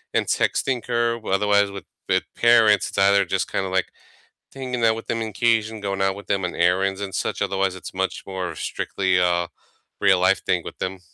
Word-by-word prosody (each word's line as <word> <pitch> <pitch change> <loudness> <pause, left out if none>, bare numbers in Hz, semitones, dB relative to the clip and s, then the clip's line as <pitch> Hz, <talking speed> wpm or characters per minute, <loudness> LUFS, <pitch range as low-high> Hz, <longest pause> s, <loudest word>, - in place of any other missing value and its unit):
and - - +2
texting 130 -3 0
her, 120 -1 0
otherwise 100 0 +2
with 100 -3 -9 0.2
with - - +2
parents, 115 -4 +4
it's - - -9
either 100 0 +5
just 95 +1 -2
kinda, 95 - -1
like, 95 0 0 0.7
hanging 125 -3 -3
out 110 0 +4
with 115 - -8
them 115 - -1
on 110 - -3
occasion, 110 0 0
going 95 -1 -2
out 95 0 +1
with 100 - -11
them 95 -1 0
on 90 - -3
errands 95 +3 +1
and 100 -2 -5
such, - - -2
otherwise, 95 -1 0
it's 95 - -9
much 95 0 -2
more 95 -2 -4
strictly 95 -2 -1
a 85 -1 +1 0.5
real 95 -2 +4
life 95 +1 +3
thing - - +1
with - - -9
them. 95 0 -4
100 Hz, 200 wpm, -23 LUFS, 95-110 Hz, 0.7 s, either